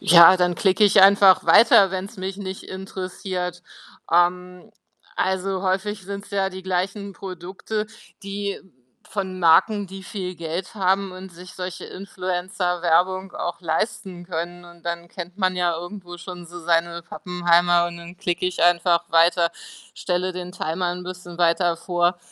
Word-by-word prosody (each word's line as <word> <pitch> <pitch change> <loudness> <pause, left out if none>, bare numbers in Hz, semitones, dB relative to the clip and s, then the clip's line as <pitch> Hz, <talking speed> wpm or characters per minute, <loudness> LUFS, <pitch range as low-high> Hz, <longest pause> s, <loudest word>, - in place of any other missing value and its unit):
Ja, 170 +2 +8
dann 180 -1 +1
klicke 195 +3 +3
ich 205 - +6
einfach 195 -1 +7
weiter, 205 -4 +6
wenn's 195 +4 -5
mich 190 0 -5
nicht 190 -1 -6
interessiert. 185 -1 -5 0.5
Ähm, 180 +1 +1 0.5
also 190 0 -1
häufig 195 +2 -1
sind's 200 +1 -7
ja 195 -1 0
die 190 0 -9
gleichen 190 +2 -2
Produkte, 190 +3 -5 0.4
die 200 0 -4 0.5
von 190 -2 -4
Marken, 195 +5 +4
die 190 +1 -9
viel 185 -3 -5
Geld 170 +5 -5
haben 195 -1 +1
und 185 +1 -10
sich 180 +2 -12
solche 180 -1 -6
Influencer-Werbung 185 -1 -1
auch 175 0 -4
leisten 175 +1 -3
können 175 0 -5
und 175 -1 -16
dann 170 0 -4
kennt 175 0 -8
man 185 -2 0
ja 175 -2 +1
irgendwo 175 0 -8
schon 175 0 -9
so 175 +1 -10
seine 170 0 0
Pappenheimer 175 0 +2
und 170 - -9
dann 170 +1 -11
klicke 175 0 -1
ich 180 -1 -2
einfach 175 0 +3
weiter, 170 +1 +4 0.4
stelle 180 0 -2
den 180 0 -7
Timer 175 0 -2
'n 180 0 -7
bisschen 180 -1 -9
weiter 170 0 +2
vor 175 +1 0
180 Hz, 150 wpm, -23 LUFS, 175-190 Hz, 0.5 s, Ja